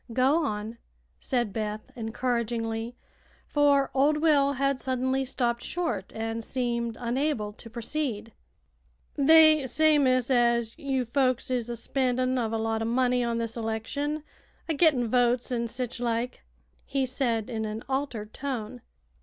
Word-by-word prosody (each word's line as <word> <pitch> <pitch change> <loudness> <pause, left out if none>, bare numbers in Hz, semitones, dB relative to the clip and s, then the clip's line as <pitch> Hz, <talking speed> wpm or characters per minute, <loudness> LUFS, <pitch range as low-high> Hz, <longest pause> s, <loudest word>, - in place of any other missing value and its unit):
"Go 270 +7 +3
on," 220 -2 -4 0.4
said 240 -6 -1
Beth, 215 0 -4
encouragingly, 230 0 -2 0.5
for 285 -2 +3
old 285 +3 +3
Will 290 -3 +3
had 275 0 0
suddenly 260 +1 0
stopped 240 -2 -1
short 245 - -3
and 225 +1 -3
seemed 235 -2 -2
unable 240 -3 -1
to 230 - -11
proceed. 235 -2 -3 0.8
"They 310 -1 +6
say, 310 +3 +4
miss, 255 -2 +2
as 235 -2 +2
you 270 -4 -1
folks 255 0 0
is 245 -2 -1
a 240 - -3
spendin' 255 +1 0
uv 235 -4 0
a 225 - 0
lot 225 0 -1
o' - - -1
money 250 +1 +2
on 235 -1 -1
this 230 -1 -2
election, 240 +7 -3 0.4
a 325 - 0
gittin' 285 -6 +3
votes, 245 +1 +2
an' 235 -1 -1
sich 245 +1 -4
like," 240 0 -2 0.4
he 275 -1 -1
said, 240 -4 -1
in 225 -3 -3
an 215 +1 -5
altered 260 -6 -3
tone. 235 - -5
245 Hz, 145 wpm, -27 LUFS, 230-275 Hz, 0.8 s, They